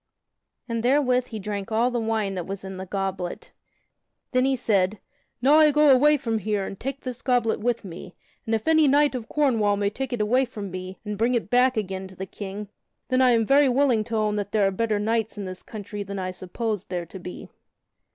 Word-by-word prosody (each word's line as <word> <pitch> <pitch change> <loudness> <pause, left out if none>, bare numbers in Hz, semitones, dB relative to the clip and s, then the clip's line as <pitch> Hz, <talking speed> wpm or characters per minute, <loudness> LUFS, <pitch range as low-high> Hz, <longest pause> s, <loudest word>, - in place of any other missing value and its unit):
And 230 -2 -2
therewith 250 0 +2
he 220 - -6
drank 205 0 -5
all 235 +3 +2
the 245 - -1
wine 220 -3 -1
that 180 -3 -4
was 195 0 -5
in 190 -1 -7
the 190 0 -7
goblet. 190 -2 -4 0.8
Then 255 0 +3
he 270 0 +2
said: 200 -4 +1 0.4
"Now 290 +4 +6
I 310 -1 +7
go 300 0 +4
away 295 +3 +5
from 230 -5 -2
here 210 -2 -1
and 195 - -7
take 270 +2 -4
this 255 -1 -6
goblet 245 -4 +1
with 235 -1 -1
me; 180 0 -9 0.3
and 225 - +2
if 220 - -4
any 315 -2 +5
knight 290 +1 +4
of 240 -3 -5
Cornwall 225 -9 +2
may 200 0 0
take 265 +3 -4
it 245 - -2
away 245 +5 +2
from 205 -5 -7
me 185 +1 -6
and 210 -1 -4
bring 240 +2 +2
it 235 - -2
back 250 0 +4
again 190 -2 -3
to 190 - -14
the 190 - -5
King, 200 +1 -7 0.4
then 255 0 +3
I 255 - +6
am 230 -2 +3
very 275 +3 +5
willing 250 -4 +3
to 230 - -4
own 210 -1 +1
that 205 0 -4
there 210 -2 +3
are 195 - +2
better 215 +2 0
knights 220 +1 -1
in 205 - -4
this 185 -1 -7
country 205 -1 -7
than 200 0 -5
I 185 -1 -3
supposed 205 +3 -4
there 175 -2 -3
to 190 +3 -10
be." 180 0 -9
220 Hz, 225 wpm, -25 LUFS, 195-250 Hz, 0.8 s, I